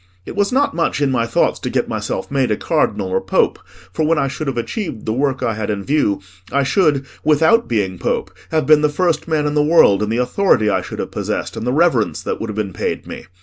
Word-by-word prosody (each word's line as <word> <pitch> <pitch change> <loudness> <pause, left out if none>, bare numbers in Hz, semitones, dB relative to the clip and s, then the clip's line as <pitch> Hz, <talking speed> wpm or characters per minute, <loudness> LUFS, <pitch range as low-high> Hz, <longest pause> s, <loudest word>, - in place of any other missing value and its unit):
It - - -8
was 200 0 +1
not 275 +3 +2
much 165 -3 0
in 140 -2 +1
my 115 -2 0
thoughts 115 - +1
to - - -4
get - - 0
myself 95 - -4
made 135 -3 +1
a 105 - 0
Cardinal 95 - 0
or 95 +1 0
Pope, 95 - +1 0.3
for 155 - -1
when 160 +1 +2
I 140 - +1
should 150 +2 -5
have 135 - -2
achieved 145 - -4
the 110 - -1
work 135 +1 -1
I 115 - 0
had 110 -1 -4
in 100 -2 -2
view, 135 -9 +1 0.3
I 140 +2 +2
should, 140 -2 +2 0.2
without 160 +10 +3
being 95 -6 -1
Pope, - - -2 0.2
have 160 -1 0
been 155 -1 +5
the 150 - +3
first 170 +3 0
man 155 -2 0
in 150 - 0
the 150 - +3
world 150 -10 +5
in 105 - -1
the 115 - 0
authority 125 - +2
I 95 - +1
should - - -8
have - - -4
possessed, - - -3
and 120 - -4
the - - +2
reverence 145 -6 +1
that - - -3
would 115 - -4
have 105 - -5
been 100 -3 -2
paid - - -3
me. - - -9
135 Hz, 250 wpm, -18 LUFS, 110-155 Hz, 0.3 s, been